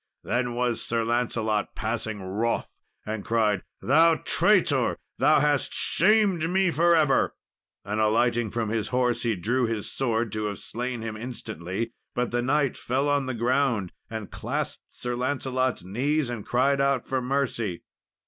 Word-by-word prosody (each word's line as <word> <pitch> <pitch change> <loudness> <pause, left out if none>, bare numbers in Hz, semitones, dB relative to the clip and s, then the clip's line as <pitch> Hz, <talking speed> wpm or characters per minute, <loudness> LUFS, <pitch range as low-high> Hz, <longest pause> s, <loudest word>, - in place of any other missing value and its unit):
Then 120 0 -1
was 120 -1 0
Sir 115 -1 0
Lancelot 115 -3 0
passing 110 -2 -3
wroth, 105 +5 -1 0.3
and 110 -1 -4
cried, 110 -4 +1 0.2
"Thou 160 +5 +5
traitor! 150 - +2 0.2
Thou 145 +4 +5
hast 145 -1 +1
shamed 190 -4 +3
me 190 0 +2
for 170 +2 +4
ever!" 150 -5 +3 0.5
and, 105 +2 -1
alighting 115 +1 +2
from 115 0 -2
his 110 -1 -1
horse, 125 -1 +1
he 115 -2 +1
drew 120 +7 0
his 110 -3 -3
sword 115 -4 0
to 110 0 -2
have 105 -1 -3
slain 120 0 -4
him 110 -1 -4
instantly; 115 -2 -5 0.2
but 125 -1 0
the 120 0 +1
knight 135 +1 +1
fell 135 +4 0
on 140 -2 +1
the 130 - -2
ground 120 -5 +1 0.2
and 110 -3 -6
clasped - - -3
Sir 125 0 -4
Lancelot's 130 -3 -1
knees, 130 +8 0
and 115 -4 -6
cried 135 +3 +2
out 140 -2 +1
for 130 -1 -1
mercy. 125 -8 -1
120 Hz, 155 wpm, -26 LUFS, 110-135 Hz, 0.5 s, Thou